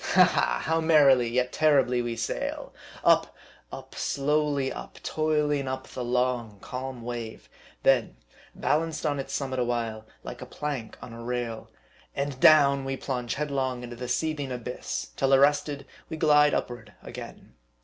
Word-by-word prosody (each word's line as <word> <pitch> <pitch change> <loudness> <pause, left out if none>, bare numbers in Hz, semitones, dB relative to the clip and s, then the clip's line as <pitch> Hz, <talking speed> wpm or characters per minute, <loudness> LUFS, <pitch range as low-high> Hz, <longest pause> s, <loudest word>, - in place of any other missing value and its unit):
Ha! - - +8
ha! - - +1
how 160 +1 +1
merrily, 140 -7 +5
yet 125 +1 0
terribly, 140 -5 +3
we 120 -1 -3
sail! 115 -1 -4 0.3
Up, - - +3 0.4
up - - -9
slowly 145 -1 0
up - - -9
toiling 150 -3 0
up 130 0 -4
the 125 - -5
long, 120 -3 -1
calm 130 +1 -6
wave; 120 -2 -6 0.4
then - - +3 0.4
balanced 160 0 0
on 145 -2 0
its 135 - -5
summit 130 -2 -2
a - - +2
while, 115 -2 -3 0.2
like - - -8
a - - -7
plank 140 -7 -5
on 115 - -9
a 115 - -9
rail; 120 -2 -4 0.5
and 140 -1 -3
down, 140 -2 +6
we 135 0 -3
plunge 125 -4 -3
headlong 135 -4 -2
into 120 0 -7
the 125 +1 -6
seething 145 0 -1
abyss, 125 0 -5
till 135 0 +2
ar 135 - +7
rested, 145 0 +2 0.2
we 160 - -5
glide 150 -1 +5
upward 115 -3 -5
again. - - -10
130 Hz, 160 wpm, -27 LUFS, 120-145 Hz, 0.5 s, Ha